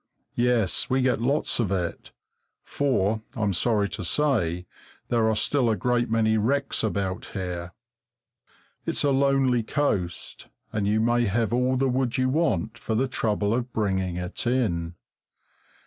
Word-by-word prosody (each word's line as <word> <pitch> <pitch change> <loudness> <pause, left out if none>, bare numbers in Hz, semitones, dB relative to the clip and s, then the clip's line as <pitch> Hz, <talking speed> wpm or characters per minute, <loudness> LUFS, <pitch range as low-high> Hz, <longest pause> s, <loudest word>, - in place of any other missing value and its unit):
Yes, 120 -6 +1
we 130 0 +2
get 125 -3 +1
lots 140 +4 +1
of 105 -5 0
it, 90 -3 -3 0.5
for 110 -6 0
I'm 105 -4 0
sorry 105 +2 +2
to 100 - -5
say 90 - 0 0.4
there 115 -2 +2
are 110 - +1
still 125 +2 +1
a 110 - +2
great 120 +3 0
many 110 -1 +2
wrecks 135 +5 0
about 100 +1 -2
here. 90 -2 -4 1.1
It's - - 0
a 145 - +3
lonely 135 -2 +3
coast, 110 - -2 0.3
and 105 -2 0
you 110 +1 +2
may 120 +1 +2
have 110 +2 0
all 125 +1 +2
the 135 +1 +2
wood 130 -1 0
you 130 0 +2
want 115 - 0
for 110 - -2
the 130 +4 +1
trouble 105 -4 0
of 125 +1 -2
bringing 95 -4 0
it 90 +7 -4
in. 90 -10 0
115 Hz, 150 wpm, -25 LUFS, 100-130 Hz, 1.1 s, a